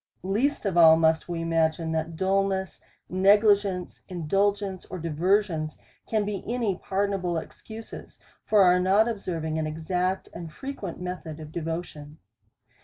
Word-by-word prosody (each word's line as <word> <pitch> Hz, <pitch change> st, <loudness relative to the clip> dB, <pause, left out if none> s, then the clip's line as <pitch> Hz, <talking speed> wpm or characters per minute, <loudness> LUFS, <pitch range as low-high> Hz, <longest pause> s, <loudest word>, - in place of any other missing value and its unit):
Least 225 Hz, +9 st, 0 dB
of 190 Hz, -3 st, 0 dB
all 160 Hz, -1 st, +8 dB
must 160 Hz, +1 st, +2 dB
we 170 Hz, -1 st, -2 dB
imagine, 165 Hz, 0 st, +1 dB
that 160 Hz, +1 st, -2 dB
dulness, 190 Hz, +1 st, 0 dB, 0.3 s
negli 205 Hz, +3 st, +5 dB
gence, 195 Hz, -3 st, -4 dB
indulgence, 195 Hz, +3 st, 0 dB
or -, -, -7 dB
diversions, 165 Hz, 0 st, 0 dB, 0.3 s
can 215 Hz, -2 st, 0 dB
be 205 Hz, -2 st, -4 dB
any 230 Hz, -6 st, 0 dB
pardon 200 Hz, +2 st, -1 dB
able 175 Hz, -2 st, -1 dB
excuses 220 Hz, +7 st, -9 dB, 0.3 s
for 210 Hz, -2 st, +4 dB
our 180 Hz, 0 st, +5 dB
not 195 Hz, +5 st, +4 dB
observing 165 Hz, -8 st, -3 dB
an 155 Hz, -, -1 dB
exact 180 Hz, +4 st, -2 dB
and 170 Hz, -2 st, -7 dB
fre 270 Hz, -, -8 dB
quent 200 Hz, -11 st, -6 dB
method 180 Hz, -3 st, -6 dB
of 155 Hz, -1 st, -9 dB
devotion. 160 Hz, -2 st, -5 dB
180 Hz, 145 wpm, -26 LUFS, 160-200 Hz, 0.3 s, all